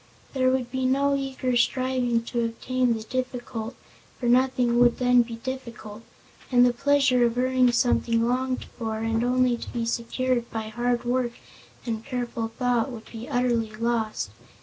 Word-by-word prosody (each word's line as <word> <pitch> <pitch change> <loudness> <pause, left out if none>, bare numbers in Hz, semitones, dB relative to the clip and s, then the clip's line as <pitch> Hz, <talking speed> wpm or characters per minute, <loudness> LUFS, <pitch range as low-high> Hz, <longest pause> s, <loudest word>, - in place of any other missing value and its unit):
There 255 -2 +2
would 255 -2 -1
be 260 0 0
no 280 +2 +2
eager 265 -2 -2
striving 250 -1 +1
to 235 0 -2
obtain 245 +1 0
the 220 - -5
difficult, 245 -2 -4 0.4
for 250 - -4
nothing 245 -1 +3
would 240 -1 +5
then 250 -1 +5
be 230 -1 -4
difficult, 235 -3 -7 0.5
and 245 -1 +6
the 245 - +3
pleasure 275 -1 +3
of 235 0 +1
earning 255 0 +3
something 235 -1 +2
longed 255 +1 -1
for, 220 -2 -5
and 225 +1 0
only 250 0 +2
to - - -8
be 235 -1 -2
secured 240 +1 -1
by 220 -1 -4
hard 240 +2 -1
work 245 -1 0 0.5
and 225 -2 -3
careful 240 -2 -3
thought, 245 0 +1
would 225 -2 -10
be 230 +1 -8
utterly 235 -3 0
lost. 225 - -1
245 Hz, 160 wpm, -25 LUFS, 230-255 Hz, 0.5 s, and